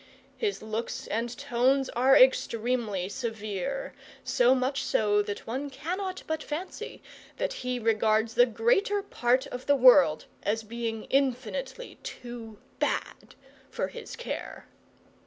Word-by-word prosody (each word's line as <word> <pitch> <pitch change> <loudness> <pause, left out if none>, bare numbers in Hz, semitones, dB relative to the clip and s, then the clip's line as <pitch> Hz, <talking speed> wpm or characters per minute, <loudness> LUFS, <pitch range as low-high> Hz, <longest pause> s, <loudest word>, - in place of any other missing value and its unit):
His 415 - -2
looks 220 +2 -4
and 235 +2 -3
tones 270 0 +2
are 260 +3 +5
extremely 230 -6 +2
severe, 220 - -4 0.3
so 250 +1 +4
much 260 +2 0
so 210 -1 +2
that 205 0 -5
one 265 +5 -3
cannot 365 +8 -4
but 315 -1 -2
fancy 320 +5 -6 0.3
that - - -1
he 250 0 -1
regards 220 -1 +2
the 245 +2 +6
greater 390 - +2
part 255 - +1
of 250 0 -7
the 285 - +5
world 255 - +6 0.2
as 220 +2 -1
being 225 0 -4
infinitely 265 - -1
too 235 -3 -8 0.2
bad - - -2 0.3
for - - -2
his - - -8
care. 485 - -6
245 Hz, 125 wpm, -28 LUFS, 225-275 Hz, 0.3 s, the